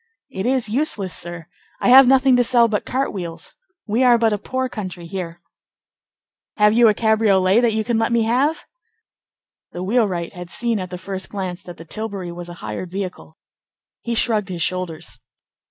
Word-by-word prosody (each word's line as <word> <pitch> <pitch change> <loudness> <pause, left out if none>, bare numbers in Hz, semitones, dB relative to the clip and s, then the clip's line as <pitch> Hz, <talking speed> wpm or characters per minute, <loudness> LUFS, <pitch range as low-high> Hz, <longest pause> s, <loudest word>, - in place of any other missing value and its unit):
"It 190 +4 -3
is 255 -2 +1
useless, 210 - -1
sir. 175 -1 -4 0.3
I - - +1
have 260 +1 +9
nothing 265 0 +5
to 245 - +4
sell 240 -1 +4
but 215 -2 -2
cart 265 +2 -1
wheels. 170 -4 -6 0.3
We 225 +4 +1
are 245 -2 +6
but 225 -2 +2
a 205 - -2
poor 260 +4 -3
country 185 -7 -7
here." 170 -1 -7 1.1
"Have 210 -1 +4
you 235 0 +5
a 210 - +3
cabriolet 215 -3 +3
that 235 -2 +2
you 220 - 0
can 235 0 0
let 225 +1 0
me 235 -1 +2
have?" 260 +8 0 1.1
The 175 - -5
wheelwright 190 -5 0
had 180 -1 -9
seen 230 +5 0
at 185 -1 -5
the 180 - -6
first 190 +1 -5
glance 185 -3 -5
that 175 -1 -11
the 165 - -11
tilbury 200 -1 -5
was 175 0 -8
a 175 - -9
hired 110 +12 -5
vehicle. 190 0 -6 0.6
He 235 -1 -3
shrugged 215 -4 +1
his 175 -3 -2
shoulders. 175 -3 -4
210 Hz, 185 wpm, -20 LUFS, 180-235 Hz, 1.1 s, have